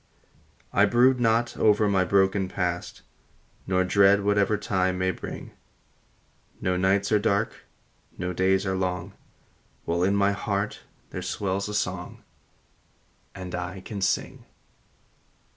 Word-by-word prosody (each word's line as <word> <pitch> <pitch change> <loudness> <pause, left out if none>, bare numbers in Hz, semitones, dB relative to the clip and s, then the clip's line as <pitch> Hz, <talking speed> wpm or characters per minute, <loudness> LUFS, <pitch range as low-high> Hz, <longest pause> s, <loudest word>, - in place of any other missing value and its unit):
I 100 - +5
brood 125 +4 +4
not 115 0 +1
over 105 0 +4
the 95 -2 +2
broken 95 +1 +2
past, 90 -2 -3 0.6
Nor 95 0 +2
dread 100 +2 +4
whatever 100 +1 +2
time 95 -2 0
may 95 0 +1
bring; - - -8 1.1
No 90 0 0
nights 95 +2 +1
are 105 - +4
dark, 100 +1 -1 0.5
no 90 0 -3
days 95 +2 +2
are 95 - 0
long, 90 0 -3 0.7
While 85 +1 0
in 95 +2 +2
my 100 0 +3
heart 100 +1 -2 0.3
there - - -5
swells 100 0 -2
a 105 - -4
song, 95 -4 -3 1.1
And 90 -1 -7
I 90 +1 -5
can 100 0 -7
sing. 95 - -1
95 Hz, 125 wpm, -26 LUFS, 95-100 Hz, 1.1 s, I